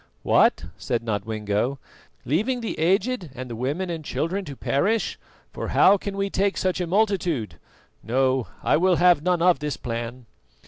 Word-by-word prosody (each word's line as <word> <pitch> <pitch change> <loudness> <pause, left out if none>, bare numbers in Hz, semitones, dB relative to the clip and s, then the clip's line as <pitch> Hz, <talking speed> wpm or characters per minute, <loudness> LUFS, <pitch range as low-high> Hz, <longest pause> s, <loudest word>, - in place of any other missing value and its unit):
"What," - - +3
said 115 -1 -2
Nodwengo, 110 +3 -2 0.5
"leaving 220 - 0
the 225 - -4
aged 195 +3 +1
and 125 -1 -7
the - - -4
women 145 +10 -2
and 165 -2 -5
children 180 +7 -2
to 140 - -7
perish, 205 - 0 0.3
for - - -4
how 195 - +5
can 195 0 -6
we 195 0 0
take 200 0 0
such 185 -1 0
a 175 - -2
multitude? 180 - 0 0.4
No, 130 +1 +1 0.2
I - - +3
will 180 +2 +3
have 175 -3 +4
none 175 0 +1
of 180 -1 +4
this 150 -2 -3
plan." 120 +1 -5
165 Hz, 165 wpm, -24 LUFS, 125-190 Hz, 0.5 s, how